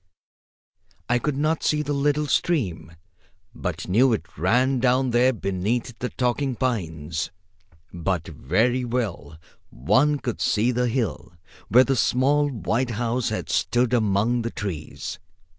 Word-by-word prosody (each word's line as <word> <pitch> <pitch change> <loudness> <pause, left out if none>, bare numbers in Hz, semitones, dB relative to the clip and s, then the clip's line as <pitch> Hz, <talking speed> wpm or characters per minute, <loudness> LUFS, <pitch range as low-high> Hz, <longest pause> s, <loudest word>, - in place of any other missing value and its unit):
I 120 0 +2
could 145 +1 -2
not 155 +2 +1
see 150 0 +1
the 145 0 -2
little 145 +1 +1
stream, 105 - -1 0.6
but 90 -2 -4
knew 120 +7 +4
it 85 -5 -5
ran 125 - +2
down 130 +1 +2
there 125 +2 +4
beneath 110 +3 -2
the 125 - -2
talking 130 +1 -1
pines. 80 - -2 0.6
But 85 -1 -2
very 110 - 0
well 110 -11 -3 0.3
one 135 - +2
could 125 -4 -4
see 115 +4 +2
the 125 0 0
hill 110 - -2 0.3
where 125 +3 +6
the 135 0 0
small 140 +5 +2
white 120 +1 -1
house 120 0 0
had - - -3
stood 120 0 +1
among 110 +1 +2
the 115 - -2
trees. 95 -9 -6
120 Hz, 135 wpm, -24 LUFS, 95-130 Hz, 0.6 s, where